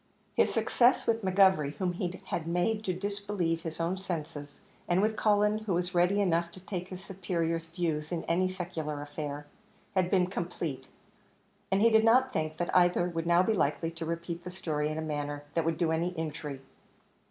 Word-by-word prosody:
His -, -, +3 dB
success 245 Hz, +1 st, +3 dB
with 225 Hz, -1 st, +1 dB
McGovery, 185 Hz, -6 st, +4 dB
whom 180 Hz, +3 st, -1 dB
he 180 Hz, 0 st, -3 dB
had 165 Hz, -1 st, -3 dB
made 195 Hz, +6 st, 0 dB
to 185 Hz, -, +1 dB
disbelieve 200 Hz, -4 st, -1 dB
his 160 Hz, 0 st, -6 dB
own 170 Hz, +3 st, 0 dB
senses, 155 Hz, -6 st, -5 dB, 0.3 s
and 175 Hz, +1 st, +3 dB
with 215 Hz, +2 st, +2 dB
Cullen, 210 Hz, 0 st, +3 dB
who 215 Hz, -5 st, -1 dB
was 180 Hz, +1 st, -1 dB
ready 180 Hz, +3 st, +3 dB
enough 170 Hz, -3 st, +1 dB
to -, -, -10 dB
take 180 Hz, -1 st, -5 dB
his 185 Hz, 0 st, -8 dB
superior's 170 Hz, -3 st, -2 dB
views 160 Hz, -2 st, -2 dB
in 170 Hz, -2 st, -2 dB
any 185 Hz, +2 st, +1 dB
secular 170 Hz, -5 st, -4 dB
affair, 145 Hz, 0 st, -5 dB, 0.5 s
had 185 Hz, -3 st, +2 dB
been 185 Hz, -2 st, +4 dB
complete; 170 Hz, -7 st, -4 dB, 0.8 s
and 195 Hz, +1 st, +3 dB
he 230 Hz, -, +6 dB
did 220 Hz, 0 st, +5 dB
not 255 Hz, +3 st, +4 dB
think 155 Hz, 0 st, -2 dB
that 175 Hz, -, -2 dB
either 175 Hz, 0 st, +4 dB
would 165 Hz, -1 st, -3 dB
now 175 Hz, +1 st, +5 dB
be 220 Hz, -, +2 dB
likely 165 Hz, -2 st, 0 dB
to 165 Hz, 0 st, -6 dB
repeat 170 Hz, +1 st, -4 dB
the 180 Hz, -, -6 dB
story 155 Hz, -5 st, -2 dB
in 155 Hz, -, -3 dB
a -, -, -1 dB
manner 145 Hz, -1 st, -3 dB
that 165 Hz, -1 st, +1 dB
would 165 Hz, 0 st, 0 dB
do 165 Hz, -2 st, +1 dB
any 165 Hz, +2 st, +1 dB
injury. 150 Hz, -4 st, -5 dB
175 Hz, 190 wpm, -30 LUFS, 160-190 Hz, 0.8 s, he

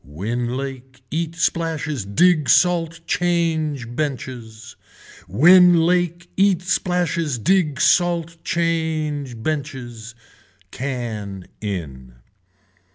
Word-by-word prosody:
Win 120 Hz, -, -3 dB
lake, 130 Hz, -1 st, -7 dB
eat 165 Hz, +1 st, -2 dB
splashes 160 Hz, -, -1 dB
dig 150 Hz, -, +3 dB
salt 165 Hz, -2 st, +3 dB
change 160 Hz, -7 st, 0 dB
benches. 120 Hz, -6 st, -5 dB, 0.5 s
Win 175 Hz, -, +6 dB
lake 175 Hz, 0 st, +1 dB
eat 190 Hz, -2 st, +2 dB
splashes 175 Hz, -5 st, 0 dB
dig 155 Hz, -, +1 dB
salt 170 Hz, -1 st, +1 dB
change 160 Hz, -6 st, -1 dB
benches. 125 Hz, -7 st, -5 dB, 0.6 s
Can 110 Hz, -8 st, -5 dB, 0.2 s
in. 70 Hz, -, -6 dB
150 Hz, 85 wpm, -21 LUFS, 120-170 Hz, 0.6 s, Win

